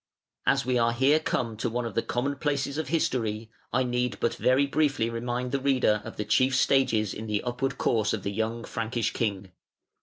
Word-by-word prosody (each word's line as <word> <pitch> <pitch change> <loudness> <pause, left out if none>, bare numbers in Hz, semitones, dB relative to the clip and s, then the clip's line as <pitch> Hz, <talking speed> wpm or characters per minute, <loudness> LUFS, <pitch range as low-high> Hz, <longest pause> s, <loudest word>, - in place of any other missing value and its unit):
] - - -65
As - - +3
we 125 -1 +1
are 115 0 +2
here 135 +6 +4
come 115 -7 -2
to 120 - -1
one 120 +1 -2
of 115 - -4
the - - +1
common 135 +5 -2
places 140 0 -1
of 160 - -3
history, 115 -8 -1 0.2
I 130 - +2
need 125 0 -1
but 115 - +1
very 130 +2 +3
briefly 140 -5 +1
remind 120 +2 -3
the 140 - 0
reader 130 -6 +2
of - - -9
the 105 - -2
chief 130 +4 +3
stages 125 -6 +2
in 110 +1 -6
the 105 -1 -1
upward 125 +2 -2
course 110 -2 +1
of 110 - -3
the 100 - -2
young 110 +3 -2
Frankish 115 0 -2
king. 100 -4 -2
120 Hz, 210 wpm, -27 LUFS, 110-135 Hz, 0.2 s, here